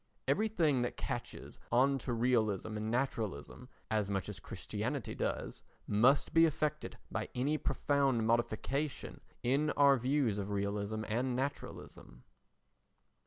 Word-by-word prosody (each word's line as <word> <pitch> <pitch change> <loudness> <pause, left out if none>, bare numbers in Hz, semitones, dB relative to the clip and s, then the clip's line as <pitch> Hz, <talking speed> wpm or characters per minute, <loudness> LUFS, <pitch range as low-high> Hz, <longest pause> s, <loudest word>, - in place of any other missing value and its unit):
Everything 170 - +2
that 120 - -2
catches - - -5
on 135 +3 +4
to 130 - -4
realism 110 -4 +1
and 110 +1 -3
naturalism 115 - -2 0.2
as 105 -2 +1
much 95 -3 -2
as - - -7
Christianity - - -4
does - - -3 0.2
must 120 +7 +3
be 165 0 +7
affected 150 0 -2
by - - -3
any 135 +5 +1
profound 135 -4 +1
modification 120 +5 -1 0.2
in 140 +5 +2
our 140 -1 +6
views 125 -4 +1
of 100 0 -3
realism 100 +2 -2
and 125 +3 0
naturalism. 125 - -5
125 Hz, 120 wpm, -34 LUFS, 110-140 Hz, 0.2 s, be